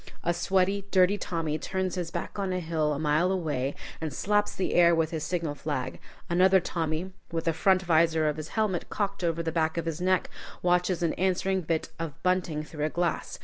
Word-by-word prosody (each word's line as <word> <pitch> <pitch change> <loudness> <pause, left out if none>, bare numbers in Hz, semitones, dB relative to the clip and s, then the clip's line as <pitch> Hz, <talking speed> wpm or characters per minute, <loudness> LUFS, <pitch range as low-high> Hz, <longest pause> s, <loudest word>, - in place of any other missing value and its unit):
A 170 - +2
sweating, 190 +3 +1
dirty 185 +1 +4
Tommy 160 -3 -2
turns 190 -1 -2
his 175 -3 -3
back 200 - -5
on 195 -2 -1
a 185 - 0
hill 160 -3 0
a 145 - -1
mile 155 +4 +2
away 150 -7 -1 0.3
and 160 -2 -2
slaps 205 +9 +1
the 190 - -1
air 170 -1 +6
with 160 -1 +1
his 160 -3 -3
signal 165 -4 -2
flag; 145 -3 -4 0.3
another 185 +2 +5
Tommy, 165 +1 -2 0.2
with 165 -1 -2
the 165 - +2
front 190 +3 +3
visor 160 -2 +3
of 150 0 0
his 155 0 -5
helmet 210 -5 0
cocked 200 -2 -2
over 170 -1 0
the 165 - -1
back 160 0 0
of 170 - -1
his 165 +1 -3
neck, 185 0 +1 0.3
watches 180 0 +2
an 165 - +1
answering 190 +1 +1
bit 165 -1 -1
of 165 -4 -4
bunting 180 -4 +1
through 150 -1 -4
a - - 0
glass. 170 -1 -2
170 Hz, 205 wpm, -28 LUFS, 160-185 Hz, 0.3 s, air